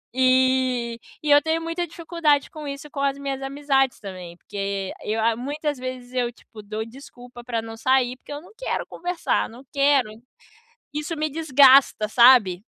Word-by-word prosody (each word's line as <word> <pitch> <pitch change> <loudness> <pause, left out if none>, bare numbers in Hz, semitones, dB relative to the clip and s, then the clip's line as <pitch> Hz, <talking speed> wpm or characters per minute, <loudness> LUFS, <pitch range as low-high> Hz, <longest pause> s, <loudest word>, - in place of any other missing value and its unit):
Eh, 255 -2 +2 0.3
e 300 - -2
eu 290 0 +7
tenho 320 0 0
muita 330 +1 -3
dificuldade 325 -3 0
com 305 -2 -8
isso, 280 +1 -7
com 280 - -6
as 280 0 0
minhas 275 -1 -4
amizades 270 -1 0
também, 185 -4 -9
porque 195 -1 -4
eu, 220 +1 -2
ah, 230 0 +2
muitas 290 +3 -3
vezes 255 -1 -7
eu, 245 -1 0
tipo, 225 -2 -15
dou 215 +2 -5
desculpa 245 -1 -13
pra 235 -2 -2
não 225 0 -8
sair 255 0 +2
porque 290 - -14
eu 290 - -5
não 360 - -17
quero - - -3
conversar, 355 0 -2
não 245 +4 -13
quero! 275 -4 +3 0.8
Isso 300 +2 -3
me 310 0 -1
desgasta, 275 -6 +5
sabe? 225 -7 +5
260 Hz, 170 wpm, -23 LUFS, 235-290 Hz, 0.8 s, eu